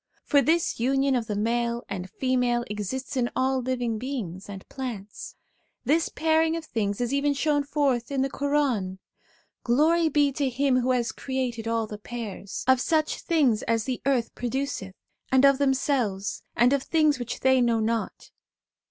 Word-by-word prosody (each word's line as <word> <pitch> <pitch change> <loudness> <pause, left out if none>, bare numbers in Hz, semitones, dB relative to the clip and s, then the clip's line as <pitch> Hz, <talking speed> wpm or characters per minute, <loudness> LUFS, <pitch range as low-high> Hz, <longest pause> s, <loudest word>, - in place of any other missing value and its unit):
For 285 - +4
this 325 -1 +1
union 270 +2 +2
of 235 -3 -1
the 210 - -2
male 235 +2 0
and 190 -2 -5
female 250 0 0
exists 210 +7 -4
in 245 -2 +1
all 260 0 +1
living 245 -3 -2
beings 210 -8 -5
and 195 -1 -9
plants. 225 -7 -7 0.5
This 310 +6 +2
pairing 320 0 +2
of 325 - -7
things 205 -6 -2
is 245 +2 -1
even 285 +1 +1
shown 290 +1 +1
forth 275 -5 0
in 270 -1 +1
the 270 - -1
Quran: 275 -11 0 0.4
' - - -38
Glory 315 +7 +3
be 290 -1 +3
to 275 0 -1
Him 260 0 +2
who 250 +1 -1
has 245 -2 +1
created 250 -4 -3
all 230 -1 0
the 210 -1 -8
pairs: 215 -3 -6
of 260 -1 +5
such 310 0 +1
things 280 -10 +2
as 230 -1 0
the 255 0 -3
earth 255 -4 +1
produceth, 245 -6 -3 0.4
and 265 +1 +5
of 275 -1 +5
themselves; 260 -7 0
and 245 +4 +4
of 280 - +2
things 305 -2 +2
which 245 -1 -5
they 260 -1 +4
know 235 -2 +2
not.' 225 +1 -2
255 Hz, 170 wpm, -26 LUFS, 230-280 Hz, 0.5 s, of